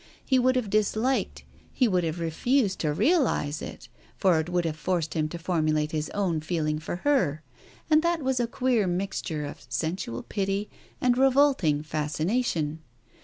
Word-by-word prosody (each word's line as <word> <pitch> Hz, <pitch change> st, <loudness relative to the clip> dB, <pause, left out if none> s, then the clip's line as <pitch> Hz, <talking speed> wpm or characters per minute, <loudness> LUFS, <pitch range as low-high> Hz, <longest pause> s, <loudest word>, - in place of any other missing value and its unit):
He 260 Hz, -1 st, +3 dB
would 255 Hz, +1 st, +3 dB
have 235 Hz, -6 st, -1 dB
disliked 215 Hz, +5 st, 0 dB, 0.2 s
— -, -, -30 dB
he 250 Hz, -, +2 dB
would 180 Hz, -4 st, +1 dB
have 165 Hz, +1 st, -2 dB
refused 195 Hz, -, +1 dB
to 155 Hz, -, 0 dB
realize 165 Hz, -, +1 dB
it, -, -, -8 dB, 0.3 s
for 185 Hz, -5 st, +3 dB
it 160 Hz, +2 st, -3 dB
would 175 Hz, -1 st, 0 dB
h|ive 160 Hz, -2 st, -1 dB
forced 165 Hz, -1 st, -1 dB
him 155 Hz, -1 st, 0 dB
to 170 Hz, -, -6 dB
formulate 155 Hz, -3 st, 0 dB
his 155 Hz, -1 st, -2 dB
own 185 Hz, -6 st, 0 dB
feeling 155 Hz, -2 st, -1 dB
for 155 Hz, -, -4 dB
her, 160 Hz, -, +2 dB, 0.4 s
and 310 Hz, -1 st, +5 dB
that 340 Hz, -2 st, 0 dB
was 260 Hz, -1 st, +1 dB
a 240 Hz, -, +1 dB
queer 240 Hz, -4 st, +1 dB
mixture 175 Hz, -4 st, -2 dB
of 145 Hz, -3 st, -9 dB
sensual 125 Hz, -1 st, -3 dB
pity, 195 Hz, 0 st, -2 dB, 0.3 s
and 250 Hz, 0 st, +2 dB
revolted 260 Hz, -, +3 dB
fascination. 155 Hz, +2 st, -1 dB
180 Hz, 170 wpm, -27 LUFS, 155-245 Hz, 0.4 s, and